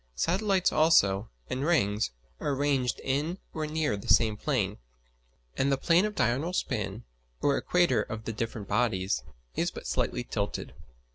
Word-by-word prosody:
Satellites 190 Hz, -, +2 dB
also, 115 Hz, -11 st, +4 dB, 0.2 s
and 130 Hz, +2 st, -2 dB
rings, 105 Hz, -, +2 dB, 0.3 s
are 140 Hz, -, -1 dB
arranged 135 Hz, -3 st, +1 dB
in 145 Hz, +7 st, -1 dB, 0.2 s
or 155 Hz, -1 st, -2 dB
near 155 Hz, -6 st, 0 dB
the 100 Hz, -, -8 dB
same 110 Hz, -2 st, +4 dB
plane; 105 Hz, -5 st, -1 dB, 0.8 s
and 140 Hz, +1 st, +1 dB
the 135 Hz, -, +2 dB
plane 170 Hz, +7 st, +4 dB
of 210 Hz, -1 st, -3 dB
diurnal 140 Hz, -, +1 dB
spin, 110 Hz, -, -2 dB, 0.4 s
or 140 Hz, -1 st, +2 dB
equator 175 Hz, -11 st, +2 dB
of 110 Hz, +1 st, -6 dB
the 115 Hz, -, -3 dB
different 110 Hz, -2 st, -4 dB
bodies, 95 Hz, -, +1 dB, 0.3 s
is -, -, +1 dB
but -, -, -9 dB
slightly 125 Hz, -, -1 dB
tilted. 105 Hz, -3 st, -3 dB
130 Hz, 150 wpm, -29 LUFS, 105-155 Hz, 0.8 s, also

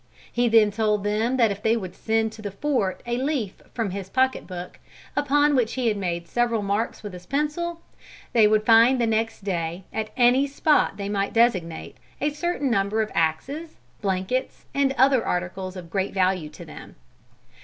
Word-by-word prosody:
He 240 Hz, 0 st, +1 dB
then 220 Hz, -2 st, +5 dB
told 210 Hz, -1 st, 0 dB
them 220 Hz, +5 st, 0 dB
that 230 Hz, -4 st, +4 dB
if 200 Hz, +1 st, -5 dB
they 225 Hz, +2 st, +2 dB
would 185 Hz, -5 st, -6 dB
send 220 Hz, +2 st, 0 dB
to 220 Hz, -, -11 dB
the 205 Hz, -, -4 dB
fort 200 Hz, -2 st, -1 dB
a 240 Hz, 0 st, -1 dB
leaf 260 Hz, -7 st, -2 dB
from 225 Hz, -5 st, -2 dB
his 190 Hz, 0 st, -6 dB
pocket 260 Hz, +2 st, +1 dB
book, 180 Hz, -1 st, -8 dB, 0.4 s
upon 290 Hz, +1 st, +3 dB
which 240 Hz, -4 st, +1 dB
he 250 Hz, -3 st, +1 dB
had 215 Hz, -, 0 dB
made 175 Hz, -3 st, -3 dB
several 235 Hz, +1 st, 0 dB
marks 205 Hz, +4 st, -2 dB
with 205 Hz, -3 st, -7 dB
his 180 Hz, 0 st, -11 dB
pencil, 315 Hz, +4 st, -2 dB, 0.5 s
they 220 Hz, -3 st, +6 dB
would 215 Hz, 0 st, +2 dB
find 235 Hz, +3 st, +6 dB
the 235 Hz, -, +2 dB
next 225 Hz, -1 st, -1 dB
day, 175 Hz, -2 st, -3 dB
at 220 Hz, -1 st, -2 dB
any 255 Hz, +3 st, +4 dB
spot 295 Hz, +2 st, +2 dB
they 200 Hz, -1 st, -4 dB
might 200 Hz, -1 st, -1 dB
designate, 185 Hz, -9 st, +1 dB, 0.2 s
a 295 Hz, +1 st, 0 dB
certain 300 Hz, -3 st, -1 dB
number 205 Hz, +1 st, +1 dB
of 215 Hz, -, -7 dB
axes, 265 Hz, -, -1 dB, 0.3 s
blankets, 195 Hz, +6 st, -2 dB
and 280 Hz, -1 st, +2 dB
other 265 Hz, -3 st, +4 dB
articles 185 Hz, +1 st, -3 dB
of 175 Hz, -3 st, -9 dB
great 195 Hz, 0 st, -2 dB
value 185 Hz, -4 st, +1 dB
to 150 Hz, -, -11 dB
them. -, -, -11 dB
220 Hz, 185 wpm, -24 LUFS, 195-255 Hz, 0.5 s, they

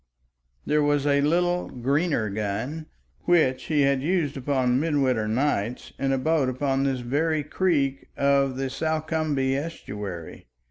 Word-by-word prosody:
There 150 Hz, 0 st, +2 dB
was 145 Hz, -1 st, +2 dB
a 140 Hz, -1 st, +3 dB
little 175 Hz, +4 st, +1 dB
Greener 140 Hz, 0 st, 0 dB
gun 110 Hz, +10 st, -3 dB, 0.4 s
which 130 Hz, -7 st, +3 dB
he 150 Hz, -3 st, +1 dB
had 140 Hz, -1 st, +2 dB
used 160 Hz, -2 st, 0 dB
upon 130 Hz, -2 st, +1 dB
midwinter 135 Hz, -8 st, +1 dB
nights 120 Hz, -1 st, -1 dB
in 135 Hz, 0 st, 0 dB
a 135 Hz, -, +2 dB
boat 150 Hz, -1 st, +1 dB
upon 135 Hz, +1 st, 0 dB
this 135 Hz, -2 st, -1 dB
very 150 Hz, +5 st, 0 dB
creek 140 Hz, -5 st, 0 dB
of 140 Hz, -1 st, +2 dB
the 135 Hz, -1 st, -2 dB
Salcombe 155 Hz, -3 st, -1 dB
estuary. 105 Hz, -, -6 dB
140 Hz, 135 wpm, -25 LUFS, 130-155 Hz, 0.4 s, a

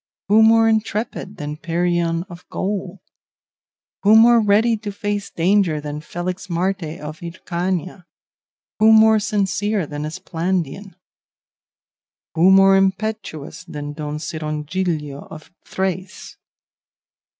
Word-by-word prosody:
Who 215 Hz, +2 st, +6 dB
more 225 Hz, 0 st, +5 dB
intrepid 215 Hz, -2 st, -2 dB
than 150 Hz, -2 st, -5 dB
Perion 170 Hz, 0 st, 0 dB
of 175 Hz, -2 st, -12 dB
Gaul? 195 Hz, -1 st, -4 dB, 1.0 s
Who 210 Hz, +2 st, +5 dB
more 235 Hz, +1 st, +7 dB
ready 215 Hz, +3 st, +3 dB
to 210 Hz, -1 st, -6 dB
face 205 Hz, 0 st, -3 dB
danger 175 Hz, -2 st, +1 dB
than 150 Hz, 0 st, -6 dB
Felixmarte 175 Hz, 0 st, -3 dB
of 155 Hz, +3 st, -8 dB
Hircania? 180 Hz, +1 st, -4 dB, 0.7 s
Who 220 Hz, +1 st, +6 dB
more 220 Hz, 0 st, +6 dB
sincere 205 Hz, -1 st, -1 dB
than 145 Hz, 0 st, -6 dB
Esplandian? 180 Hz, +2 st, -3 dB, 1.4 s
Who 170 Hz, +3 st, +4 dB
more 195 Hz, 0 st, +6 dB
impetuous 195 Hz, -5 st, -2 dB
than 145 Hz, -4 st, -6 dB
Don 150 Hz, 0 st, -5 dB
Cirongilio 155 Hz, -1 st, -4 dB
of 155 Hz, +1 st, -12 dB, 0.2 s
Thrace? 190 Hz, 0 st, -4 dB
185 Hz, 105 wpm, -20 LUFS, 160-205 Hz, 1.4 s, more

